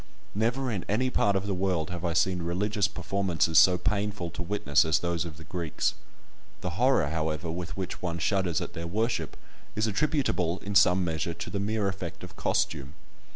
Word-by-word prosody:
Never 120 +5 0
in 95 -6 -2
any 125 +5 +1
part 100 -4 +2
of 95 0 0
the 100 - -1
world 90 -4 0
have 90 -1 -5
I 85 -1 0
seen 90 +2 +2
religious 100 +4 0
performances 90 -4 +2
so 90 -1 +6
painful 100 -2 -1
to 85 - -6
witness 85 -6 +2
as 80 -2 +3
those 85 -1 -1
of 80 -3 -8
the 80 - -10
Greeks. 85 -4 -1 0.7
The 90 - -2
horror, 110 - +3
however, 80 +1 -2
with 90 +2 -5
which 95 -1 -4
one 85 -2 -2
shudders 90 -2 +1
at - - -5
their 85 0 -5
worship 110 +7 -1 0.4
is 110 - +1
attributable, 105 - +1
in 100 - -3
some 95 -2 +5
measure, 80 0 -2
to - - -6
the 100 - -2
mere 105 0 0
effect 95 -3 -5
of - - -9
costume. 70 -3 -1
90 Hz, 190 wpm, -28 LUFS, 85-100 Hz, 0.7 s, so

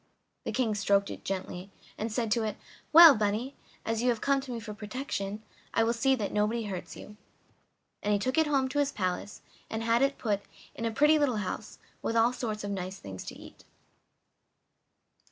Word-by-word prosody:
The - - -2
King 240 -4 +1
stroked 200 -1 +2
it - - -8
gently, 190 0 -4 0.3
and 220 +1 -3
said 225 -1 -1
to 230 - +3
it: 215 -1 -2 0.3
"Well, 330 -1 +11
bunny, 215 +5 -1 0.3
as 225 0 -1
you 250 - +2
have 235 -2 +1
come 275 +2 +2
to 265 -1 -8
me 235 - -3
for 210 -1 -7
protection 210 -2 -4 0.3
I 225 - +4
will 230 +1 +2
see 265 +3 +2
that 210 -5 -3
nobody 215 +3 +1
hurts 190 -4 -6
you." 210 - -11 0.8
And 210 - 0
he 205 - +4
took 255 +9 0
it 320 - +3
home 275 -3 +2
to 290 - -1
his 285 -1 +2
palace 185 0 -3 0.3
and 220 0 -3
had 230 +1 +3
it 275 0 +2
put 205 -3 -1 0.3
in 230 - -5
a 230 - 0
pretty 300 +6 +4
little 270 -6 +2
house, 210 +2 -5 0.2
with 225 - -2
all 230 +2 +4
sorts 220 -4 -4
of 205 - -3
nice 190 0 -4
things 95 - -8
to - - -7
eat. - - -14
225 Hz, 200 wpm, -29 LUFS, 205-255 Hz, 0.8 s, Well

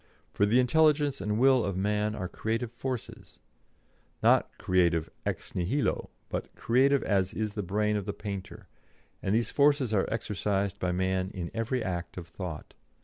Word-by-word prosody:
For 100 - +2
the 120 +5 +4
intelligence 145 -1 +3
and 105 +2 -1
will 130 0 +5
of 100 -2 -2
man 105 +2 0
are 95 -4 -3
creative 115 +4 -2
forces 125 0 -6 0.9
not - - +5
creative 85 -3 +2 0.2
ex - - -4
nihilo, 105 +11 0 0.2
but - - -5
creative 135 +4 +3
as 95 -3 +1
is 105 -1 -2
the 105 - -2
brain 105 +3 0
of 100 -1 -3
the - - 0
painter 100 -2 -7 0.5
and 95 - +1
these 115 +1 +1
forces 140 -5 +3
are 100 - +1
exercised 100 -2 -1
by 90 - 0
man 95 +1 0
in 85 -3 -4
every 115 +2 -1
act 90 -3 -4
of 85 -2 -6
thought. 85 -2 -7
105 Hz, 160 wpm, -29 LUFS, 95-120 Hz, 0.9 s, will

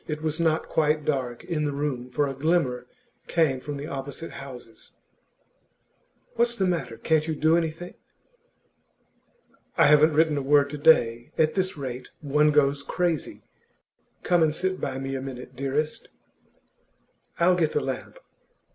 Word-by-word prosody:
It 155 0 -4
was 155 +1 -1
not 160 -1 +1
quite 150 -1 +1
dark 130 -5 -2
in 160 -4 -2
the 145 - 0
room, 140 -3 -3
for 145 +3 0
a 135 - -3
glimmer 135 -3 0 0.4
came 155 -6 +2
from 145 +2 -6
the 140 - -6
opposite 140 +3 -6
houses. 125 -5 -11 1.4
'What's 235 0 +1
the 195 - 0
matter? 135 -11 -2
Can't 155 +5 +1
you 160 - -1
do 155 +2 +3
anything?' 170 +1 -2 1.8
'I - - +6
haven't 150 +1 +6
written 155 -1 +3
a - - -3
word 140 +1 +3
to 150 - -6
day. 120 -6 +3
At 155 -1 +3
this 185 -3 -1
rate, 130 -3 -6
one 150 +1 +2
goes 145 -1 +2
crazy. 170 +1 -2 0.8
Come 175 -1 +3
and 155 -1 +2
sit 185 +2 -2
by 130 -1 -3
me 135 0 -4
a 135 - -3
minute, 130 -1 -8
dearest.' 140 +4 -2 1.3
'I'll 170 +2 +4
get 165 -4 +1
the - - +2
lamp. - - -5
150 Hz, 155 wpm, -25 LUFS, 135-160 Hz, 1.8 s, I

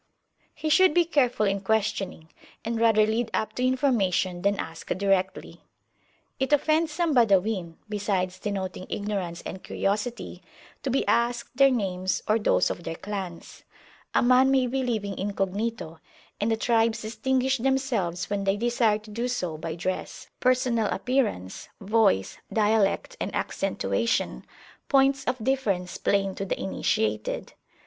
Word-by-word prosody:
He 315 - -3
should 370 0 +5
be 350 -1 +5
careful 255 -9 +2
in 195 0 0
questioning, 200 -5 -1 0.4
and 230 0 -1
rather 220 -2 +5
lead 225 +2 -1
up 215 - 0
[p.113] - - -33
to 250 +1 +2
information 200 -9 +1
than 200 +1 +1
ask 160 0 -6
directly. 190 -1 -1 0.8
It 265 +2 -1
offends 310 +2 +3
some 325 0 0
Badawin, 200 -7 +2
besides 195 -3 -1
denoting 190 -3 -4
ignorance 195 -5 -3
and 185 - -7
curiosity, 210 +5 -3 0.4
to 270 - -3
be 265 +2 +1
asked 235 +1 0
their 275 +1 +6
names 190 -6 -1
or 215 +1 +3
those 205 - +2
of 175 - -6
their 165 - -4
clans: 190 -3 -7 0.5
a - - +4
man 255 +2 +5
may 265 -1 +3
be 265 +2 -1
living 215 -6 -2
incognito, 195 -2 -3 0.4
and 210 - 0
the 225 - +1
tribes 225 -1 +1
distinguish 260 +3 0
themselves 245 -9 0
when 200 -1 -2
they 195 +1 +2
desire 235 -1 +2
to 215 0 -14
do 235 +4 -2
so 180 -10 -2
by 160 +1 -5
dress, 185 +2 -4
personal 250 -3 +2
appearance, 220 - -1
voice, 205 - +2
dialect, 215 - +1
and - - -3
accentuation, 100 - -1 0.4
points 275 0 +4
of 250 +1 0
difference 210 -9 -1
plain 195 -1 +1
to 195 - -5
the 195 - -3
initiated. 110 - -1
215 Hz, 145 wpm, -26 LUFS, 190-250 Hz, 0.8 s, their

